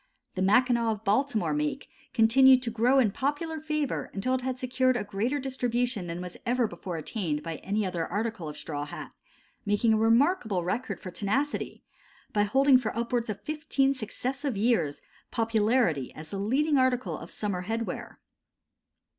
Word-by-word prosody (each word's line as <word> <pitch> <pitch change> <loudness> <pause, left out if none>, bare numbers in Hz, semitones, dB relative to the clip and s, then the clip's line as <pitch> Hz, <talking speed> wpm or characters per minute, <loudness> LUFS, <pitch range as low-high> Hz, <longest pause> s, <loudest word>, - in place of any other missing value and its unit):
The 185 - -3
"Mackinaw" 235 +4 +3
of 210 0 -9
Baltimore 215 - +1
make 150 0 -2 0.2
continued 255 +3 +6
to 230 - -2
grow 240 +4 +3
in 235 -6 +4
popular 295 - -2
favor 305 -3 -2
until 230 +6 0
it 260 - 0
had 255 0 -2
secured 255 0 +1
a 210 - -2
greater 210 +7 -1
distribution 245 -6 -1
than 170 +1 -4
was 180 -1 -8
ever 245 0 +1
before 175 -3 -5
attained 160 -3 -3
by 165 -1 -4
any 205 +2 -1
other 175 -3 -2
article 215 -6 -3
of 150 - -8
straw 145 -2 -4
hat, 150 - -8 0.5
making 210 +2 +2
a - - +3
remarkable 225 - +3
record 220 +9 -2
for 185 - -7
tenacity, 255 +11 -2 0.5
by 205 - +3
holding 265 +5 +5
for 225 -2 -4
upwards 235 0 -1
of 205 -1 -4
fifteen 295 0 0
successive 260 +2 -4
years, 200 -10 +1 0.3
popularity 220 - +1
as 155 +1 -10
the 195 - -3
leading 275 +8 +2
article 255 -1 +1
of - - -9
summer 190 -4 -3
headwear. 225 +2 -4
230 Hz, 165 wpm, -28 LUFS, 195-260 Hz, 0.5 s, continued